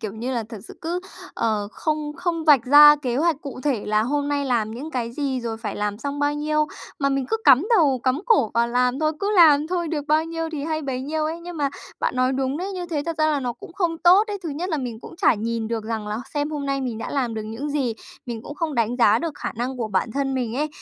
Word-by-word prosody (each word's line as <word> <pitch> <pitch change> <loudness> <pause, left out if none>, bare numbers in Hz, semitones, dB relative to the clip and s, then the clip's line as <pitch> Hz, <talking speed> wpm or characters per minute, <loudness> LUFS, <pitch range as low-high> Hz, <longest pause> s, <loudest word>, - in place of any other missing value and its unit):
kiểu 215 -3 -4
như 235 +4 -4
là, 235 -2 -1
thật 225 - -8
sự - - -10
cứ, 345 +2 -2 0.3
ờ, 210 -2 -1
không 305 -1 -2
không 340 -2 -2
vạch 285 -7 +6
ra 295 +3 +9
kế 255 -5 -2
hoạch 315 0 +1
cụ 275 -3 -7
thể 260 -6 -1
là 215 0 +2
hôm 285 +4 -1
nay 285 -1 0
làm 235 -5 0
những 260 +8 -7
cái 235 -4 -3
gì, 270 -2 -2
rồi 230 -2 -4
phải 225 -1 -5
làm 205 0 -2
xong 285 +1 -4
bao 290 0 +1
nhiêu, 305 +1 0 0.3
mà 275 - +2
mình 275 -1 -1
cứ 445 - +1
cắm 275 +6 +6
đầu 280 -8 +3
cắm 260 +3 +1
cổ 355 - +4
vào 235 0 +2
làm 250 +2 +1
thôi, 310 0 +1
cứ 405 +1 0
làm 305 -3 +7
thôi 345 -1 -2
được 300 -2 -3
bao 310 +1 +3
nhiêu 330 0 -4
thì 290 -2 -3
hay 315 0 -2
bấy 265 -3 -3
nhiêu 305 +3 -2
ấy. 325 +2 -3
Nhưng 345 0 -8
mà 290 -2 +1 0.3
bạn - - -1
nói 255 +1 +2
đúng 265 +1 -1
đấy, 380 +4 -4
như 360 -2 -4
thế 310 -4 -2
thật 330 -1 -3
ra 310 - +3
là 300 -2 +1
nó 245 -2 -2
cũng 245 +7 -13
không 340 -4 -1
tốt 365 +5 +6
đấy. 415 -2 -4
Thứ 335 - -4
nhất 320 +6 -3
là 315 - 0
mình 245 -5 -5
cũng - - -11
chả 360 -7 +4
nhìn 225 +1 -3
được 225 -2 -3
rằng 220 -1 -3
là 210 +1 -3 0.2
xem 290 +1 -1
hôm 290 -2 -4
nay 275 0 -1
mình 245 -4 -3
đã - - -5
làm 250 -5 -1
được 220 - -3
những 225 +7 -5
gì, 270 -6 0 0.3
mình 230 -2 -5
cũng 290 - -8
không 310 -1 -2
đánh 235 +1 0
giá 225 -4 +5
được 330 -2 -3
khả - - -5
năng 250 +3 -3
của 230 -3 -3
bản 210 +2 -1
thân 275 -1 -1
mình 245 -2 -2
ấy. 300 +2 0
280 Hz, 280 wpm, -23 LUFS, 235-310 Hz, 0.3 s, ra